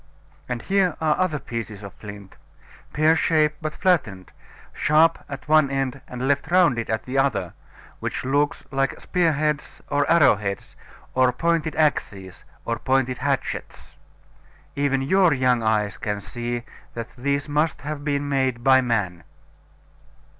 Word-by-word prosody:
And 120 Hz, -2 st, -3 dB
here 190 Hz, -4 st, +2 dB
are 155 Hz, -2 st, +2 dB
other 185 Hz, -5 st, +1 dB
pieces 115 Hz, -6 st, -6 dB
of 100 Hz, -, -8 dB
flint 100 Hz, -2 st, -11 dB, 0.6 s
pear 155 Hz, +1 st, +3 dB
shaped, 155 Hz, -2 st, +2 dB
but 155 Hz, 0 st, -4 dB
flattened, 110 Hz, -, 0 dB, 0.4 s
sharp 160 Hz, +2 st, +3 dB
at 140 Hz, -1 st, -8 dB
one 155 Hz, -2 st, +4 dB
end 135 Hz, -1 st, -2 dB
and 125 Hz, +1 st, -4 dB
left 140 Hz, +3 st, 0 dB
rounded 170 Hz, -11 st, +3 dB
at 110 Hz, 0 st, -1 dB
the 130 Hz, +1 st, -1 dB
other, 100 Hz, -11 st, 0 dB, 0.5 s
which -, -, -4 dB
look 145 Hz, +2 st, +1 dB
like 135 Hz, 0 st, -1 dB
spear 175 Hz, -3 st, +1 dB
heads, 150 Hz, 0 st, -2 dB
or 145 Hz, 0 st, +1 dB
arrow 155 Hz, -10 st, +5 dB
heads, 100 Hz, -1 st, -5 dB, 0.4 s
or 130 Hz, -1 st, +4 dB
pointed 165 Hz, +4 st, 0 dB
axes, 100 Hz, -, -1 dB, 0.2 s
or 115 Hz, -1 st, -2 dB
pointed 130 Hz, 0 st, 0 dB
hatchets -, -, -3 dB, 0.8 s
even 140 Hz, -1 st, +1 dB
your 180 Hz, +2 st, +4 dB
young 125 Hz, -2 st, +2 dB
eyes 110 Hz, -2 st, 0 dB
can 105 Hz, -1 st, -3 dB
see 120 Hz, +3 st, -4 dB, 0.3 s
that 115 Hz, 0 st, -7 dB
these 140 Hz, +3 st, -1 dB
must 150 Hz, +2 st, 0 dB
have 150 Hz, 0 st, -5 dB
been 145 Hz, -1 st, -1 dB
made 130 Hz, -4 st, 0 dB
by 130 Hz, 0 st, +6 dB
man. 100 Hz, -8 st, -1 dB
135 Hz, 145 wpm, -23 LUFS, 115-155 Hz, 0.8 s, by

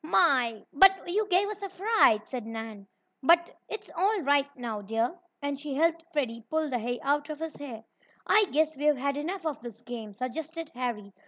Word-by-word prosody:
"My! 255 Hz, -, +3 dB
But 385 Hz, +6 st, +6 dB
you 415 Hz, +4 st, +1 dB
gave 385 Hz, +1 st, +3 dB
us 420 Hz, -1 st, -6 dB
a 395 Hz, -, -4 dB
fright!" 375 Hz, -, +3 dB
said 245 Hz, -4 st, -5 dB
Nan. 225 Hz, -3 st, -7 dB, 0.3 s
"But 340 Hz, +5 st, +4 dB
it's 435 Hz, -, -6 dB
all 390 Hz, +3 st, +2 dB
right 285 Hz, -1 st, +3 dB
now, 230 Hz, -4 st, -4 dB
dear," 225 Hz, -, -1 dB, 0.3 s
and 285 Hz, -1 st, -2 dB
she 290 Hz, -2 st, -5 dB
helped 330 Hz, +2 st, +2 dB
Freddie 240 Hz, -7 st, -2 dB
pull 315 Hz, -1 st, 0 dB
the 245 Hz, -, 0 dB
hay 245 Hz, +2 st, -3 dB
out 290 Hz, +2 st, +1 dB
of 305 Hz, -, -4 dB
his 320 Hz, 0 st, -5 dB
hair. 240 Hz, -6 st, -8 dB, 0.4 s
"I 425 Hz, -1 st, +5 dB
guess 315 Hz, -2 st, +1 dB
we've 295 Hz, +1 st, +2 dB
had 280 Hz, +2 st, -1 dB
enough 335 Hz, +5 st, -4 dB
of 300 Hz, -6 st, -2 dB
this 235 Hz, -1 st, -9 dB
game," 225 Hz, -4 st, -7 dB
suggested 315 Hz, +6 st, -5 dB
Harry. 235 Hz, -5 st, -4 dB
285 Hz, 190 wpm, -28 LUFS, 240-330 Hz, 0.4 s, But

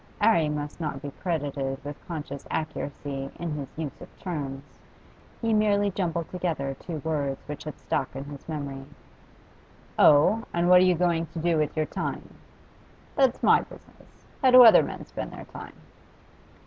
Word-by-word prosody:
'Arry 205 Hz, -8 st, +4 dB
must 150 Hz, +2 st, -4 dB
not 150 Hz, -4 st, -3 dB
be 140 Hz, +1 st, -7 dB
credited 145 Hz, -6 st, -2 dB
with 145 Hz, 0 st, -8 dB
conscious 145 Hz, -4 st, -6 dB
accuracy 140 Hz, -3 st, -4 dB
in 170 Hz, -2 st, -3 dB
his 145 Hz, -2 st, -4 dB
use 155 Hz, -3 st, -5 dB
of -, -, -10 dB
terms; 140 Hz, -6 st, -5 dB, 0.8 s
he 225 Hz, -1 st, 0 dB
merely 205 Hz, -1 st, +3 dB
jumbled 170 Hz, -3 st, -2 dB
together 160 Hz, -7 st, -2 dB
two 170 Hz, -3 st, -6 dB
words 145 Hz, -4 st, -1 dB
which 150 Hz, 0 st, -7 dB
had 155 Hz, -, -6 dB
stuck -, -, -2 dB
in 135 Hz, -, -4 dB
his 145 Hz, +2 st, -10 dB
memory. 140 Hz, -3 st, -5 dB, 1.2 s
'Oh? 155 Hz, +10 st, +6 dB
And 170 Hz, +1 st, +2 dB
what 180 Hz, 0 st, +8 dB
are -, -, +5 dB
you 180 Hz, -1 st, +4 dB
going 170 Hz, -1 st, +1 dB
to 165 Hz, +1 st, -7 dB
do 170 Hz, +1 st, +1 dB
with 155 Hz, 0 st, -1 dB
your 155 Hz, -, +2 dB
time?' -, -, -5 dB, 0.8 s
'That's 265 Hz, -3 st, +2 dB
my -, -, +6 dB
business. -, -, -17 dB, 0.2 s
How 260 Hz, -, +5 dB
do 255 Hz, 0 st, +10 dB
other 225 Hz, -, +9 dB
men -, -, -6 dB
spend -, -, -6 dB
their -, -, -9 dB
time? -, -, -10 dB
155 Hz, 165 wpm, -26 LUFS, 145-180 Hz, 1.2 s, do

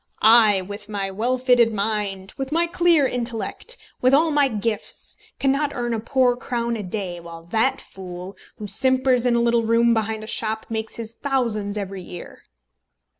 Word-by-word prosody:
"I, 215 Hz, -3 st, +6 dB
with 205 Hz, +2 st, -9 dB
my 200 Hz, -2 st, -3 dB
well 235 Hz, +6 st, 0 dB
filled 245 Hz, -2 st, +4 dB
mind, 200 Hz, -2 st, -2 dB
with 270 Hz, 0 st, -5 dB
my 335 Hz, +2 st, +2 dB
clear 340 Hz, -4 st, +3 dB
intellect, 245 Hz, -, -3 dB, 0.2 s
with 255 Hz, +2 st, +5 dB
all 320 Hz, +2 st, +3 dB
my 290 Hz, -1 st, +4 dB
gifts, 215 Hz, -2 st, -4 dB, 0.2 s
cannot 280 Hz, +2 st, +1 dB
earn 240 Hz, -2 st, -2 dB
a 225 Hz, -, -1 dB
poor 250 Hz, +2 st, +2 dB
crown 235 Hz, -1 st, -2 dB
a 220 Hz, -, -4 dB
day, 185 Hz, -2 st, -4 dB
while 170 Hz, -1 st, -10 dB
that 230 Hz, +4 st, +2 dB
fool, 185 Hz, 0 st, -9 dB, 0.2 s
who 210 Hz, -, -7 dB
simpers 255 Hz, +3 st, +2 dB
in 240 Hz, -, +3 dB
a -, -, +3 dB
little 235 Hz, 0 st, +3 dB
room 230 Hz, +1 st, +3 dB
behind 220 Hz, -1 st, -1 dB
a -, -, -6 dB
shop, 220 Hz, 0 st, -2 dB
makes 220 Hz, 0 st, -3 dB
his 230 Hz, -1 st, -6 dB
thousands 230 Hz, -7 st, -1 dB
every 195 Hz, -2 st, -5 dB
year." 175 Hz, 0 st, -10 dB
230 Hz, 175 wpm, -22 LUFS, 205-255 Hz, 0.2 s, I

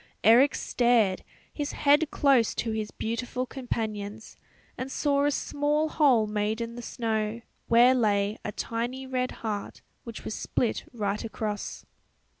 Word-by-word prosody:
Eric 245 Hz, +7 st, +6 dB
stared, 235 Hz, -6 st, +2 dB, 0.3 s
his 290 Hz, -1 st, -3 dB
head 295 Hz, +2 st, +3 dB
close 270 Hz, -6 st, +3 dB
to 230 Hz, -, -2 dB
his 215 Hz, -1 st, -2 dB
beautiful 245 Hz, +3 st, -3 dB
companion's, 220 Hz, -5 st, -5 dB, 0.4 s
and 260 Hz, +1 st, -5 dB
saw 280 Hz, 0 st, +1 dB
a -, -, +4 dB
small 295 Hz, +2 st, 0 dB
hole 265 Hz, -9 st, +4 dB
made 210 Hz, +1 st, -1 dB
in 230 Hz, 0 st, -4 dB
the 240 Hz, -, -7 dB
snow, 225 Hz, -1 st, -2 dB, 0.3 s
where 240 Hz, +2 st, +6 dB
lay 210 Hz, -4 st, +1 dB
a 210 Hz, -, -3 dB
tiny 240 Hz, +5 st, -3 dB
red 255 Hz, -1 st, -1 dB, 0.2 s
heart 210 Hz, -2 st, -4 dB, 0.2 s
which 230 Hz, -2 st, -9 dB
was -, -, -3 dB
split 235 Hz, -, -1 dB
right 210 Hz, -2 st, -2 dB
across. 215 Hz, -2 st, -4 dB
235 Hz, 140 wpm, -27 LUFS, 215-260 Hz, 0.4 s, Eric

